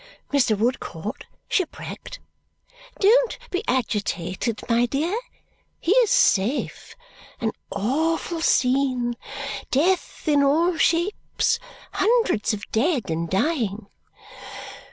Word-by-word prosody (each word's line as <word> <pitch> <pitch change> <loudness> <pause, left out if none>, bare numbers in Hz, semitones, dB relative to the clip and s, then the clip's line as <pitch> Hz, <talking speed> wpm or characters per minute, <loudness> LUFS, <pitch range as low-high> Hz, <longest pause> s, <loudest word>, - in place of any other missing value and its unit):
"Mr. 250 -7 +3
Woodcourt 220 -2 -3 0.2
shipwrecked!" 385 +6 -3 0.8
"Don't 470 +4 +4
be 365 +3 -1
agitated, 210 -3 -1
my 235 0 +3
dear. 310 - -1 0.6
He 340 - 0
is 480 -4 +5
safe. 250 - +1 0.4
An 225 -1 0 0.2
awful 320 - -1
scene. 255 -3 +2 0.6
Death 350 +5 0
in 290 -2 +4
all 325 +6 +3
shapes. 345 +6 +1 0.3
Hundreds 435 - +2
of 205 -2 -4
dead 245 - +1
and 165 +1 -2
dying. 215 - 0
265 Hz, 90 wpm, -24 LUFS, 220-340 Hz, 0.8 s, is